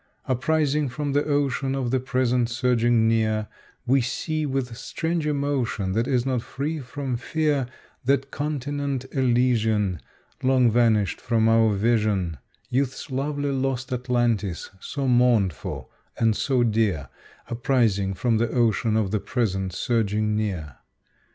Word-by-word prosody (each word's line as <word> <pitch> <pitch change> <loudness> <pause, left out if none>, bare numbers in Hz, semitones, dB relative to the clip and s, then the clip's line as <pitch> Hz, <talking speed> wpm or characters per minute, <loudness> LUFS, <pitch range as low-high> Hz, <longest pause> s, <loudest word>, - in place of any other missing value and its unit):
Uprising 145 +2 +1
from 145 +3 -3
the 145 +1 +2
ocean 140 -2 0
of 130 -3 -1
the 130 - +2
present 125 -2 +1
surging 120 -2 +2
near, 110 -1 +1 0.4
We 135 +2 +3
see, 155 +5 -2
with 130 -3 -2
strange 160 +5 -2
emotion, 140 -9 -1
that 115 +5 0
is 125 -3 +1
not 130 -3 0
free 145 +6 -4
from 135 -1 -4
fear, 145 0 0 0.4
That 135 +1 +1
continent 145 -2 -3
Elysian 115 - +1 0.4
Long 130 -2 +4
vanished 110 -5 +2
from 115 -2 +2
our 115 -2 +4
vision, 100 - +1 0.3
Youth's 130 +3 -2
lovely 145 +2 -1
lost 135 -1 -2
Atlantis, 120 -8 -1
so 140 +6 -3
mourned 120 -6 +4
for - - -7 0.3
and 115 -2 +2
so 130 0 +1
dear, 105 - 0 0.4
Uprising 115 -6 +1
from 115 +3 +1
the 120 0 +1
ocean 115 -2 +1
of 105 -4 0
the 105 - +1
present 95 -5 -1
surging 105 0 0
near. 90 - -3
120 Hz, 130 wpm, -24 LUFS, 110-135 Hz, 0.4 s, Long